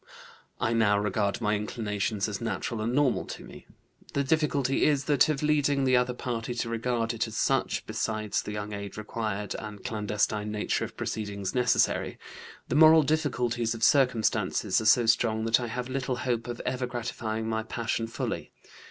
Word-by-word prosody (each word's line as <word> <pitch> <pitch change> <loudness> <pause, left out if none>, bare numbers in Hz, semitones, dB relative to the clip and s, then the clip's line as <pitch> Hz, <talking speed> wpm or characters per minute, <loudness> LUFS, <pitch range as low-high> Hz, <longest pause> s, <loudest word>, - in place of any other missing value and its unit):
I 115 - +1
now 110 -3 +3
regard 105 +2 0
my 105 -1 +2
inclinations 105 -1 -2
as 100 -2 -4
natural 115 0 -3
and 115 +2 -1
normal 145 -2 +2
to - - -8
me. - - -13 0.5
The 140 - +2
difficulty 140 -2 +1
is 145 -2 +2
that 145 +2 +4
of 150 -1 -1
leading 145 -2 +2
the 130 -1 +4
other 125 0 +2
party 120 -1 -3
to 120 -1 -2
regard 115 0 -1
it 115 0 -1
as 110 - -7
such, - - +1
besides 110 -2 -1
the - - -6
young 105 0 -5
age 100 0 -6
required 105 -1 -3
and 105 -2 -9
clandestine 105 0 -1
nature 105 0 -1
of - - -12
proceedings 100 -3 -3
necessary. 125 -1 +2 0.5
The - - -3
moral 160 +1 +8
difficulties 125 -6 0
of 115 - -6
circumstances 125 -7 +2
are - - -5
so 115 +2 +5
strong 110 -1 +2
that 115 +2 +4
I 120 - -3
have 125 +2 -4
little 130 0 -2
hope 120 -2 -1
of 120 -1 -5
ever 125 0 -1
gratifying 115 -2 -3
my 110 0 -1
passion 115 0 -2
fully. 115 +1 -4
115 Hz, 175 wpm, -28 LUFS, 110-125 Hz, 0.5 s, moral